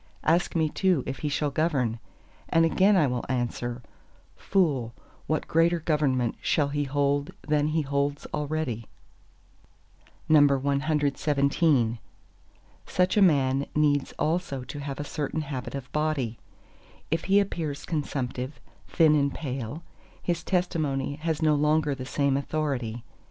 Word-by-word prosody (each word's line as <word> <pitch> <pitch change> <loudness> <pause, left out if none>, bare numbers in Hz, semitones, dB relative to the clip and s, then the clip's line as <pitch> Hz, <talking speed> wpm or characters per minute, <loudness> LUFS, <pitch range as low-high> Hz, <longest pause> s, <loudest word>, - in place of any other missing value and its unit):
Ask 170 +3 +2
me 160 -1 +3
too 180 -3 +1
if 135 - -5
he 150 - -2
shall 145 0 0
govern; 135 -7 0 0.5
and 165 0 +4
again 195 +5 +4
I 170 -5 +4
will 125 -2 -1
answer, 120 -1 -2 0.5
Fool, 140 - 0 0.3
what 155 -1 -1
greater 165 +1 +3
government 145 -7 0
shall 145 -2 +1
he 145 0 -1
hold 140 +1 0 0.2
than 150 -1 +2
he 155 0 0
holds 140 +1 -1
already? 145 -7 -2 1.4
CXVIII 140 -2 +2 0.9
Such 180 0 +1
a 210 - +4
man 140 -6 +3
needs 145 -2 +2
also 155 -4 -1
to 145 +3 -7
have 140 -1 -5
a - - -2
certain 150 +2 -3
habit 140 -3 -5
of 130 -2 -7
body. 150 -7 -1 0.7
If 165 0 0
he 195 +2 +5
appears 165 -7 -3
consumptive, 135 -4 -3 0.3
thin 160 -3 +4
and 140 -2 +2
pale, 135 +1 -5 0.4
his 175 -1 -2
testimony 155 -7 -1
has 160 0 -2
no 155 -1 +4
longer 150 0 +2
the 130 -1 -6
same 140 0 +1
authority. 135 -6 -2
145 Hz, 130 wpm, -27 LUFS, 135-155 Hz, 1.4 s, he